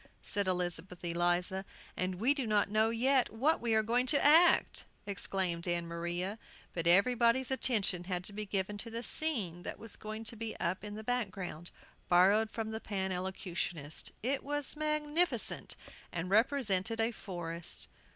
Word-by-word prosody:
said 200 -2 -1
Elizabeth 180 0 -1
Eliza. 175 +2 +1 0.3
"And 185 0 -2
we 235 +10 +2
do 275 -5 -3
not 205 -1 +2
know 215 +1 +3
yet 255 +3 +2
what 270 +9 +1
we 230 -2 +1
are 220 - +3
going 245 +3 +1
to 285 +1 +2
act!" 325 +4 +5 0.2
exclaimed 190 -3 -1
Ann 175 -1 0
Maria. 175 +5 -3 0.3
But 170 -1 -1
everybody's 235 +7 +4
attention 210 -9 +1
had 180 -1 -2
to 200 - -3
be 210 0 -4
given 195 +1 -2
to 230 - -6
the 230 +1 -5
scene 220 - +1
that - - -5
was 225 -1 -7
going 215 +1 -7 0.3
up 185 +4 -2
in 210 0 -6
the 220 - -7
background, 190 -8 -3 0.4
borrowed 200 +5 +5
from 220 0 -4
the 220 - -4
Pan 190 -2 -3
Elocutionists. 180 -4 -4
It 265 +3 -1
was 290 +1 -2
magnificent, 305 +2 0 0.4
and 175 +2 -4
represented 225 -2 +3
a 225 +1 +2
forest. 175 -6 -5
205 Hz, 155 wpm, -32 LUFS, 180-235 Hz, 0.4 s, act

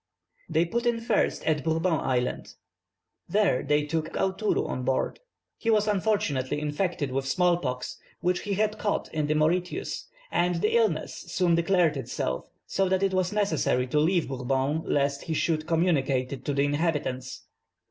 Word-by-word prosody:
They 165 - +2
put 235 +7 -1
in 235 -1 +2
first 230 -2 0
at 155 -3 +1
Bourbon 165 +2 +1
Island. 125 -1 -2 0.7
There 200 -11 +2
they 150 +1 +1
took 160 +1 -2
Aoutourou 195 +3 0
on 130 - -3
board. 130 - 0 0.4
He 230 - -1
was 215 -1 +3
unfortunately 175 -10 0
infected 150 -1 -1
with 135 +1 -1
small 175 +5 +3
pox, 125 -6 -4 0.2
which 180 0 +1
he 200 -1 -2
had 215 +1 0
caught 205 - -1
in 155 -2 0
the 155 - +1
Mauritius; 175 +4 0 0.2
and 175 0 +2
the 210 +7 +1
illness 215 -9 +1
soon 180 -3 +2
declared 170 -2 +3
itself, 65 - -3 0.2
so 195 -1 0
that 190 +1 +1
it 195 -1 +2
was 185 0 +1
necessary 170 -11 +1
to 140 +4 +1
leave 170 +2 +2
Bourbon 135 +3 -1
lest 140 0 0
he 160 - -2
should 155 0 0
communicate 140 -7 +1
it 130 -1 -8
to 145 - -1
the 140 - +3
inhabitants. 145 -4 -2
160 Hz, 165 wpm, -27 LUFS, 140-190 Hz, 0.7 s, was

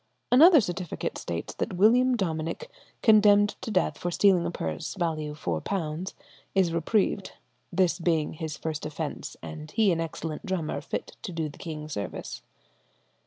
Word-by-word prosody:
Another 310 +4 +8
certificate 180 -3 -4
states 85 0 -4
that - - -3
William 245 +6 +5
Dominic, 170 - -3 0.3
condemned 205 -2 +6
to - - -5
death 185 -5 +1
for 175 - -2
stealing 180 -1 +4
a - - -1
purse, 80 - -4
value 155 -5 -2
£4, 155 - -3 0.4
is 185 -4 +3
reprieved, 190 +3 0 0.4
"this 185 0 +2
being 165 -3 +1
his 155 -1 -5
first 155 -2 -4
offence, 155 0 -5
and 155 -1 -7
he 205 +4 +3
an 165 -1 0
excellent 160 0 -5
drummer, 185 -6 -2
fit - - -5
to - - -5
do 165 -2 -2
the 145 - -14
king 155 -2 -6
service." 105 -10 -5
170 Hz, 150 wpm, -27 LUFS, 155-200 Hz, 0.4 s, Another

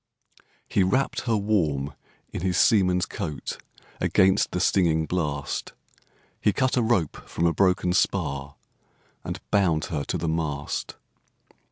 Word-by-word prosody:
He - - +1
wrapp'd 130 +11 +1
her 115 -2 +3
warm 80 -9 0 0.4
in - - -4
his 90 0 0
seaman's 90 -6 +4
coat 80 -9 -5 0.4
Against 95 0 +3
the 90 - -2
stinging 85 -3 +2
blast; 75 -5 -3 0.7
He 105 - +3
cut 130 -1 +1
a 125 - +3
rope 110 -9 0
from 85 - -1
a 85 - +3
broken 90 -1 +2
spar, 70 -4 0 0.7
And - - -5
bound 85 -6 +2
her 75 -2 -1
to - - -2
the 85 0 -3
mast. 75 -3 -2
90 Hz, 135 wpm, -25 LUFS, 75-100 Hz, 0.7 s, seaman's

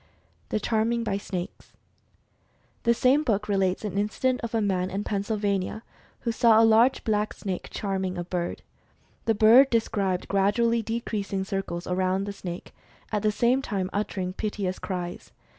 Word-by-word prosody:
THE 215 - 0
CHARMING 230 +2 0
BY 200 -3 -1
SNAKES. 185 -3 -6 1.1
The 235 - +3
same 260 +5 +4
book 210 -8 0
relates 195 0 0
an 200 -1 -2
incident 250 +5 0
of 230 -1 -4
a - - +3
man 185 -3 0
in 195 +2 -3
Pennsylvania, 205 0 -1 0.4
who 235 - -1
saw 225 -1 +5
a 225 - +6
large 225 +4 +4
blacksnake 210 -3 -2
charming 190 -2 -2
a 175 - -2
bird. 175 0 -3 0.6
The 225 - +2
bird 235 +6 +7
described 200 -6 0
gradually 230 +4 +2
decreasing 215 -4 -3
circles 190 -3 -4
around 185 +1 0
the 200 0 -4
snake, 175 -3 -7 0.4
at 210 -2 0
the 215 0 +2
same 245 +5 +2
time 195 -7 -3
uttering 190 -3 -2
piteous 200 -2 -3
cries. 180 -2 -5
205 Hz, 150 wpm, -26 LUFS, 190-225 Hz, 1.1 s, bird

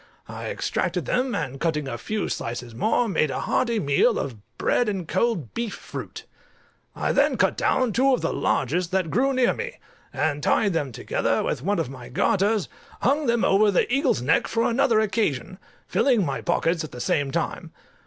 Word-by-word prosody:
I - - -6
extracted - - -2
them, 250 0 0
and 135 -3 -3
cutting 150 -3 -1
a 120 - -3
few 210 - -3
slices 120 0 -4
more, 220 - +1
made 155 -6 +1
a - - -3
hearty 235 -3 +1
meal 140 -6 +3
of 130 -4 -3 0.2
bread 245 -3 +1
and 190 -5 -3
cold 190 - 0
beef 230 -3 -3
fruit. - - -8 0.7
I - - 0
then - - +3
cut - - +2
down 255 -4 +1
two 270 +5 +3
of 255 - +2
the - - -1
largest 165 +7 0
that 185 -5 0
grew 270 +5 +2
near 255 -2 +3
me, 485 +1 -6 0.3
and 145 -2 -1
tying 200 +6 +2
them 145 -6 -1
together - - -1
with - - -2
one 200 +7 0
of 155 -6 -2
my 125 -2 -10
garters, 200 - +1 0.4
hung 285 +4 +2
them 235 -1 +2
over 205 +2 +4
the 195 - +2
eagle's 275 - +2
neck 155 +6 +2
for 230 - 0
another 240 -2 +3
occasion, 190 - -1 0.3
filling 240 -9 +2
my 135 -3 -3
pockets 170 -1 0
at 155 - -7
the 125 - -9
same 140 +3 0
time. - - -3
190 Hz, 185 wpm, -24 LUFS, 145-235 Hz, 0.7 s, over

